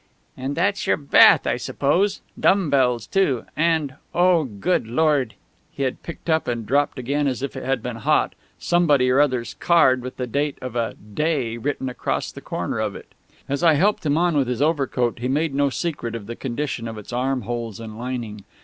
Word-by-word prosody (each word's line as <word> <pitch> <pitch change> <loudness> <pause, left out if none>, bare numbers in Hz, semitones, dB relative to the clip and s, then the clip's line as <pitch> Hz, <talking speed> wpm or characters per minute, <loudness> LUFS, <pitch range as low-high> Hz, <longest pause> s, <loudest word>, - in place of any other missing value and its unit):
"And 135 +2 -4
that's 200 +4 0
your - - +3
bath, 140 -2 +6
I - - 0
suppose.... 180 +9 0 0.2
Dumb 190 -5 +3
bells 125 -4 +2
too.... 165 - +1
And 160 -4 +1 0.2
oh, 175 -3 +4
good 110 - -1
Lord!..." 140 -2 +1 0.4
He 140 - -4
had 130 - -2
picked 170 - -9
up, 160 -1 +1
and 120 -2 -2
dropped 145 +6 +1
again 140 +3 -1
as 130 0 -2
if 140 - -4
it - - -6
had 130 -3 -1
been 125 -2 -4
hot, 110 - +1 0.2
somebody 150 -7 +3
or 130 - +3
other's 130 -5 0
card 130 -7 +4
with 125 +1 -7
the 125 - -2
date 140 +4 -1
of 130 -2 -7
a 115 -2 -1
"day" 120 +2 -2
written 130 +2 -3
across 125 - -2
the - - -10
corner - - -3
of - - -2
it.... - - -12 0.3
As 140 +2 -2
I 165 -3 +5
helped 200 +8 +2
him 150 -1 +1
on 175 -1 +2
with 140 -3 +2
his 125 -1 -2
overcoat 135 -6 0
he 125 - -2
made 150 +3 0
no 140 0 +2
secret 135 -6 -3
of 110 -3 -6
the 120 +3 -6
condition 130 -2 -3
of 110 -1 -6
its 105 +3 -9
armholes 120 -3 -2
and 110 -2 -8
lining. 115 -4 -5
135 Hz, 200 wpm, -22 LUFS, 120-155 Hz, 0.4 s, bath